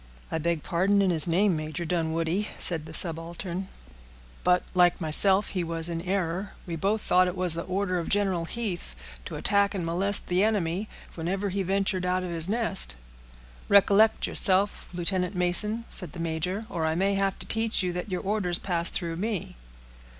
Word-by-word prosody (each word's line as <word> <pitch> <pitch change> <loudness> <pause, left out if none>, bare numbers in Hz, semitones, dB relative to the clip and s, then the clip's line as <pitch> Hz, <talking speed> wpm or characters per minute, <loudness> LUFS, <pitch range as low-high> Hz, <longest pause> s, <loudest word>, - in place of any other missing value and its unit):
"I 160 - -1
beg 165 -1 -1
pardon 190 +4 +1
in 195 -2 +2
his 165 0 +1
name, 185 +2 +2
Major 155 +2 -5
Dunwoodie," 165 +3 -1
said 160 -3 +2
the - - -10
subaltern; 170 +3 -2 0.8
"but, 180 0 +3
like 180 -1 +3
myself, 190 +5 +4
he 180 -2 -2
was 165 0 -1
in 165 -1 -3
error. 185 +1 -3
We 170 - -5
both 200 +6 -1
thought 185 0 +3
it 180 0 -4
was 180 -2 +1
the 170 - -3
order 185 -1 -1
of 170 - -5
General 195 -4 0
Heath, 185 - -4 0.3
to - - -7
attack 200 0 +1
and 180 -3 -3
molest 190 +4 +2
the 180 +2 +1
enemy 205 -2 -1 0.2
whenever 190 +5 -3
he 195 +1 -2
ventured 190 0 -1
out 185 0 0
of 180 - -5
his 165 +1 +1
nest." 210 - +2 0.7
"Recollect 200 +2 +4
yourself, 195 +1 +4
Lieutenant 180 +1 -1
Mason," 210 +6 +1
said 180 -6 -3
the 175 - -9
major, 170 +6 -3
"or 170 -6 -4
I 160 0 0
may 195 +3 +1
have 195 -1 -1
to - - -5
teach 225 -3 -1
you 180 -1 -2
that 180 +4 -5
your 180 -1 -3
orders 195 -3 +1
pass 170 -3 0
through 165 -3 -3
me." 205 -1 -4
180 Hz, 180 wpm, -26 LUFS, 170-200 Hz, 0.8 s, myself